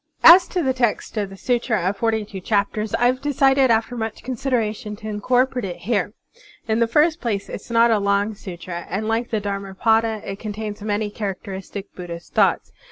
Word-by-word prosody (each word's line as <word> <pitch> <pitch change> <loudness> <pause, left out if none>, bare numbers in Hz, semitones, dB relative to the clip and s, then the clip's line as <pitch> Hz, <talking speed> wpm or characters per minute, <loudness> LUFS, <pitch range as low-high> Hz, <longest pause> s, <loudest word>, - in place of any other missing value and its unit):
As 350 +2 +9
to 360 -3 -1
the 260 -2 +1
text 240 -4 -1
of 205 -2 -1
the 195 - -11
Sutra 240 -1 0
of 195 - 0
Forty 220 0 0
two 200 -2 -8
Chap 200 +2 0
ters, 215 -1 -2
I 245 - +1
have 255 +1 +2
decided 270 -2 +3
after 230 +2 +1
much 220 -2 -4
consideration 230 -4 -2
to 215 +1 -9
incorporate 250 +4 +1
it 180 -3 -4
here. 205 -1 -1 0.5
In 220 0 +1
the 230 - +3
first 310 +7 +2
place, 205 -5 -2
it - - -10
is - - -17
not 230 0 +4
a 220 - +3
long 200 +1 +1
sutra, 175 -3 -7
and 210 +4 -2
like 225 +2 0
the 220 - 0
Dharmapada 205 +2 0
it 195 0 -6
contains 210 -1 -5
many 210 0 -1
characteristic 195 -1 -6
Buddhist 170 -2 -8
thoughts. - - +2
220 Hz, 195 wpm, -22 LUFS, 200-240 Hz, 0.5 s, As